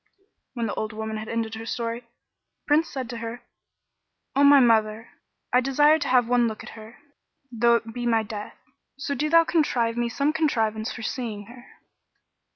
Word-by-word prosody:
'" - - -54
When 235 -2 -2
the 210 - -3
old 215 0 -4
woman 220 0 -4
had 215 0 -7
ended 225 -1 -2
her 225 0 -7
story, 230 0 -3
the 235 - -34 0.6
Prince 310 +3 +2
said 260 -3 -5
to 235 - -6
her, 230 +1 -7 0.9
"O 280 - +4
my 285 0 +8
mother, 225 -2 +2 0.4
I 250 - +5
desire 295 +4 +4
to 285 - -3
have 250 -2 +3
one 245 -1 +3
look 220 -1 -6
at - - -10
her, 220 +1 -12 0.5
though 235 0 +3
it 230 -1 -3
be 240 0 -3
my 225 -1 +2
death; 210 -1 -8 0.4
so 280 +1 -3
do 300 +2 -1
thou 330 +1 +6
contrive 245 -9 0
me 240 0 0
some 280 +5 0
contrivance 225 -8 0
for 245 - -8
seeing 220 -4 -4
her." 240 +3 -14
235 Hz, 190 wpm, -25 LUFS, 220-270 Hz, 0.9 s, my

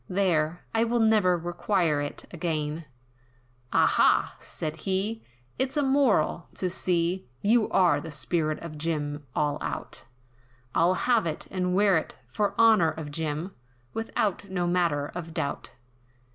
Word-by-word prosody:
there, 175 -4 0
I 225 0 +3
will 235 +1 +1
never 215 -5 +4
require 175 -2 0
it 145 - -5
again," 160 -2 -3 0.9
"Aha!" - - +3
said 155 0 -5
he, 195 +6 -2 0.4
"It's 265 +3 -1
a 295 - +3
moral, 265 - +2
to 185 -1 -2
see 180 -1 0 0.2
You're 190 -8 +3
the 160 - -7
spirit 155 +2 0
of 155 -3 -7
Jim 145 -2 -3
all 150 -1 0
out, 70 -3 -5 0.7
I'll 175 +3 +3
have 230 -2 +2
it, 155 - -3
and 180 -1 0
wear 200 -2 +4
it, - - -9
for 200 - -2
honour 220 -8 +6
of 160 -2 -6
Jim, 160 +4 -3 0.4
Without 210 -3 -2
no 180 -2 -1
manner 170 -5 +1
of 165 -2 -7
doubt. 140 - -3
175 Hz, 135 wpm, -27 LUFS, 155-200 Hz, 0.9 s, honour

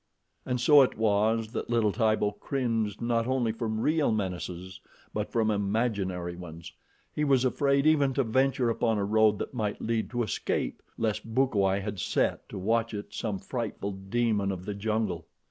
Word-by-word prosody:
And 125 -1 0
so 145 +4 +7
it 130 - +2
was 110 +1 +2
that - - -4
little 115 -3 +2
Tibo 110 -1 +2
cringed 115 -6 -1
not 115 0 +1
only 130 -3 +1
from 110 -1 -3
real 150 +1 +2
menaces 95 -3 -4 0.3
but 105 0 -3
from 110 -2 +2
imaginary 100 -4 -1
ones. 85 -2 -9 0.4
He 150 - -1
was 135 -3 +3
afraid 140 +2 +2
even 145 -3 +4
to 135 - +2
venture 130 +1 +2
upon 115 -1 +1
a 100 - 0
road 110 0 +4
that - - -5
might 105 -4 -2
lead 115 -1 -1
to 120 0 -1
escape, 105 - -2 0.2
lest 110 0 -2
Bukawai 100 -7 +2
had 105 -1 -5
set - - 0
to - - -7
watch 115 +3 0
it 105 - -7
some 105 -4 -2
frightful 105 -1 -4
demon 100 +1 0
of 90 -1 -6
the 105 - -3
jungle. 100 -5 -2
110 Hz, 170 wpm, -28 LUFS, 100-120 Hz, 0.4 s, so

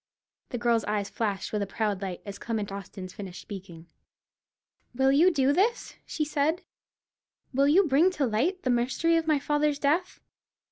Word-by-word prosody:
The 245 - -3
girl's 235 -2 +2
eyes 205 -1 -2
flashed 205 -3 -2
with 210 - 0
a 200 - -2
proud 205 -1 -2
light, 185 -3 -5
as 200 -1 -7
Clement 215 -4 -3
Austin 195 -1 -7
finished 185 -1 -8
speaking. 180 -5 -9 1.1
"Will 265 +1 +3
you 315 +7 +6
do 280 -3 +2
this?" 445 +9 +1
she 305 - -2
said; 305 +3 0 0.9
"will 275 +2 +3
you 345 +7 +5
bring 315 +3 +4
to 295 -6 0
light 275 - 0
the 255 - +1
mystery 260 +8 +1
of 325 -1 0
my 305 -2 +4
father's 295 +1 0
death? 305 +6 0
260 Hz, 170 wpm, -27 LUFS, 205-300 Hz, 1.1 s, you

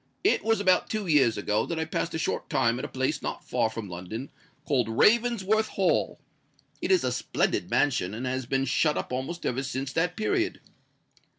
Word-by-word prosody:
"It 400 - +3
was 225 0 +2
about 185 -3 +3
two 215 -2 -2
years 140 -9 +3
ago 105 +1 0
that 170 - -3
I 160 - -1
passed 160 +1 -2
a - - 0
short 160 - -2
time 120 -1 +2
at - - -3
a - - -4
place 130 0 -1
not - - -4
far 110 - +1
from 110 -2 -6
London, 90 +9 -7 0.3
called 125 -6 +1
Ravensworth 220 - +3
Hall. 190 -2 0 0.6
It - - -2
is 375 -2 +4
a - - 0
splendid - - -1
mansion, 125 -9 +1
and 120 +4 -4
has 130 -1 -2
been 135 +1 +1
shut 150 +4 +2
up - - -4
almost 135 +7 -4
ever 125 +2 0
since 135 0 -4
that 180 +2 0
period. 345 - 0
140 Hz, 195 wpm, -27 LUFS, 125-190 Hz, 0.6 s, is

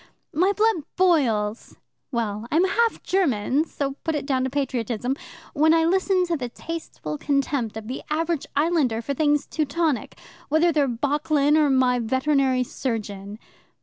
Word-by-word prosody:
My 365 +5 +3
blood 440 0 +2 0.2
boils 240 - +1 0.3
well, 225 -2 -2
I'm 325 +4 +4
half 455 +4 +1
German, 290 - +1
so 275 -3 -4
put 320 -1 -1
it 285 -2 -3
down 265 -2 0
to 260 - -1
patriotism 250 -2 -2 0.4
when 315 +2 +4
I 325 0 +3
listen 375 +1 +2
to 345 -1 -1
the 250 -5 -4
tasteful 235 - -6
contempt 275 -5 -1
of 220 -1 -7
the 255 - -5
average 325 0 -1
islander 285 -7 +1
for 280 - -2
things 295 0 +2
Teutonic, 310 -1 -1 0.3
whether 315 +3 +3
they're 295 -3 +2
Bocklin 290 +4 +1
or 305 -2 +4
my 255 -2 +3
veterinary 260 +2 +1
surgeon. 210 -5 -4
280 Hz, 150 wpm, -24 LUFS, 245-320 Hz, 0.4 s, I'm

